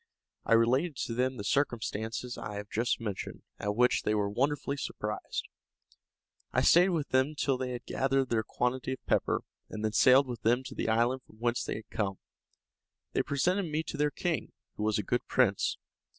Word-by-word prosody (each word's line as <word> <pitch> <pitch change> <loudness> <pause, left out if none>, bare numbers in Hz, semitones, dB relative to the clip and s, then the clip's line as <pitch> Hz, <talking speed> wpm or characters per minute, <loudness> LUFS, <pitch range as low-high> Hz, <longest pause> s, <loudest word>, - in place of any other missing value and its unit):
I - - +3
related 130 +8 +3
to 115 - -3
them 130 +2 0
the 100 - -5
circumstances 115 -1 -1
I 105 - -6
have 105 0 -7
just 115 +2 0
mentioned, 105 -4 -5 0.2
at 105 0 -1
which 125 +2 +3
they 105 - +1
were 100 -1 0
wonderfully 140 +4 0
surprised. 105 -6 -4 1.0
I - - +2
stayed 180 +3 +6
with 160 -5 -1
them 130 +4 +2
till 140 -2 +1
they 125 0 -3
had 120 0 -6
gathered 135 0 +1
their 115 -2 +3
quantity 125 +4 -1
of 130 - -10
pepper, - - +1 0.3
and 110 0 -4
then 110 - +1
sailed 130 +4 +6
with 120 -3 -5
them 120 +3 +2
to 130 +1 -8
the - - -2
island 120 +4 +2
from 110 - -20
whence 120 +2 0
they - - -3
had 110 0 -9
come. 100 -3 -1 0.9
They - - +2
presented 175 +6 0
me 155 +1 0
to 155 - -6
their 150 0 +2
king, 165 +2 -2 0.2
who - - -6
was 105 -1 +1
a 105 - -1
good - - -1
prince. - - +2
125 Hz, 195 wpm, -30 LUFS, 110-135 Hz, 1.0 s, stayed